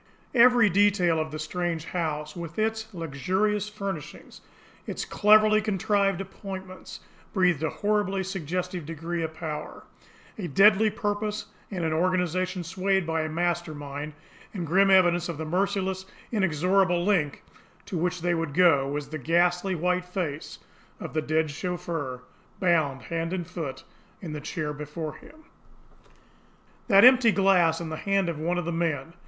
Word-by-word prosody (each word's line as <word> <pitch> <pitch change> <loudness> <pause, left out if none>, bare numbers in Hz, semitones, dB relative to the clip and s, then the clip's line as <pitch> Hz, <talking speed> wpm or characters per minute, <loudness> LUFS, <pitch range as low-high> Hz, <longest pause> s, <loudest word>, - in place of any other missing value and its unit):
Every 245 -2 +6
detail 190 -4 +3
of 155 0 -2
the 155 - -6
strange 165 +1 -3
house, 155 -4 -3
with 170 -2 -7
its 220 0 -1
luxurious 190 +6 -1
furnishings, 195 -7 -7 0.5
its - - -4
cleverly 215 +1 +5
contrived 200 -2 +1
appointments, 190 -1 -8 0.3
breathed 180 -6 +2
a 160 - 0
horribly 205 -1 0
suggestive 180 -1 -4
degree 165 +1 -4
of 160 -1 -4
power, 155 -2 -6 0.6
a 185 - -3
deadly 210 +7 +5
purpose, 210 -1 -2 0.2
and 180 -5 -3
an 160 - 0
organisation 180 +1 0
swayed 190 +2 0
by 160 0 -1
a 155 - -2
master 170 0 -1
mind; 145 +1 -6 0.4
and, 175 -3 -3
grim 195 +5 +4
evidence 175 -2 +4
of 165 - -4
the 160 - -4
merciless, 190 +2 -1 0.2
inexorable 180 -2 +2
length 175 -9 +1 0.4
to - - -6
which 175 +1 -1
they 175 0 +2
would 165 -4 -2
go, 160 -7 +5
was 145 0 -4
the 155 0 -5
ghastly 175 +5 +1
white 180 +2 0
face 175 -5 -4 0.4
of - - -7
the 155 - 0
dead 155 0 0
chauffeur, 165 -6 -4 0.4
bound 155 -8 +1
hand 165 +6 -3
and 180 -2 -2
foot, 145 -6 -6 0.4
in 160 -4 -7
the 150 - -5
chair 150 -1 -3
before 150 +1 -6
him! 315 +1 -17 1.4
That 200 -1 +7
EMPTY 250 -3 +7
glass 180 -5 +3
in 170 -2 -5
the 160 - -4
hand 195 -1 0
of 160 -3 -4
one 175 +3 -1
of 175 - -2
the 170 - -2
men! 165 -2 -2
175 Hz, 150 wpm, -26 LUFS, 160-195 Hz, 1.4 s, That